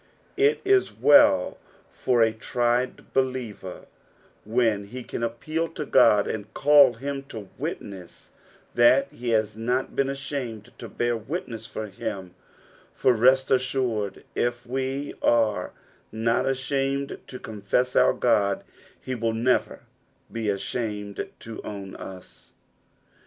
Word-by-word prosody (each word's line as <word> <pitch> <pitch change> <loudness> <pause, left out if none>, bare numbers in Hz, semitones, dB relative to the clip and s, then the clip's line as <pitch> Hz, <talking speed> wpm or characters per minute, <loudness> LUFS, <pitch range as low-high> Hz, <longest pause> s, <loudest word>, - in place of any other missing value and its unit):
It 430 +2 +3
is 395 -1 +3
well 290 0 +5 0.3
for 120 -2 +1
a 110 -1 +2
tried 120 +2 -1
believer 125 -8 -2 0.6
when 110 -2 +1
he 125 +4 -7
can - - -6
appeal 155 +8 -2
to 150 - -4
Qod 105 -6 +5
and 105 -1 -5
call 145 -2 +6
him 140 +3 -4
to 110 -7 -9
witness 95 -4 -7 0.4
that 120 +3 +4
he 120 0 -5
has 110 -2 +1
not 125 +4 -1
been 135 0 +1
ashamed 135 -6 -5
to - - -8
bear 120 0 0
witness 115 -2 -5
for 110 - -5
him; 100 -2 -6 0.6
for 130 - +3
rest 130 +3 +4
assured 125 -5 0
if 120 0 -1
we 135 +3 -3
are 115 -3 +2 0.4
not 115 +3 0
ashamed 135 +1 -1
to 130 - -8
confess 110 +3 -1
our - - +5
God, 100 -5 +1 0.4
he 130 - -5
will 115 -2 -1
never 120 +3 +1 0.5
be 115 -2 -2
ashamed 105 0 -3
to 115 -1 -8
own 100 -2 -7
ua. 95 -1 -9
120 Hz, 125 wpm, -25 LUFS, 110-130 Hz, 0.6 s, call